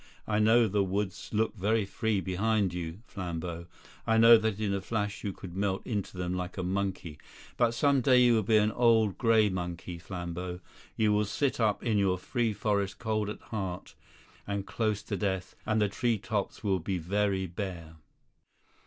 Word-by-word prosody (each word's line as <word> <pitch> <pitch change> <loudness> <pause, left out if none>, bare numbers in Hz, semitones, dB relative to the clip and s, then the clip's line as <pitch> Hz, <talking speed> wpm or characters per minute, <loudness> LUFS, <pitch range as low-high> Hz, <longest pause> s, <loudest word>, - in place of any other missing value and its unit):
I 105 -1 +1
know 115 +2 +5
the 100 0 +1
woods 95 0 -3
look 110 +1 0
very 105 +2 +1
free 105 0 -1
behind 95 +1 0
you, 90 +4 -5
Flambeau; 85 -4 -5 0.4
I 115 0 +3
know 115 +1 +9
that 110 -2 0
in 105 -2 0
a 100 - -1
flash 105 -1 -3
you 100 - -2
could 90 -2 -10
melt 95 -1 -1
into 100 -5 -3
them 90 0 -2
like 90 +1 -4
a 95 - -2
monkey. 95 -4 -3 0.4
But 120 -1 +2
some 140 -1 +3
day 125 0 +5
you 120 -1 +5
will 110 - +3
be 110 +2 +3
an 105 0 +3
old 110 -4 +3
grey 115 -3 +4
monkey, 90 -1 -5
Flambeau. 90 0 -5 0.4
You 105 -1 +3
will 105 0 +2
sit 135 +7 -1
up 110 -3 +1
in 110 -4 +1
your 95 -2 +2
free 115 +5 -1
forest 100 -1 -1
cold 110 -2 -1
at 105 - -7
heart 95 -4 -4 0.5
and 100 -1 -2
close 105 -2 -1
to - - -3
death, 95 -3 -2
and 110 0 +2
the 105 - +3
tree 115 +3 0
tops 105 -1 -3
will 95 -3 +1
be 90 +3 -2
very 95 +2 0
bare." 85 -3 -6
100 Hz, 185 wpm, -29 LUFS, 95-110 Hz, 0.5 s, know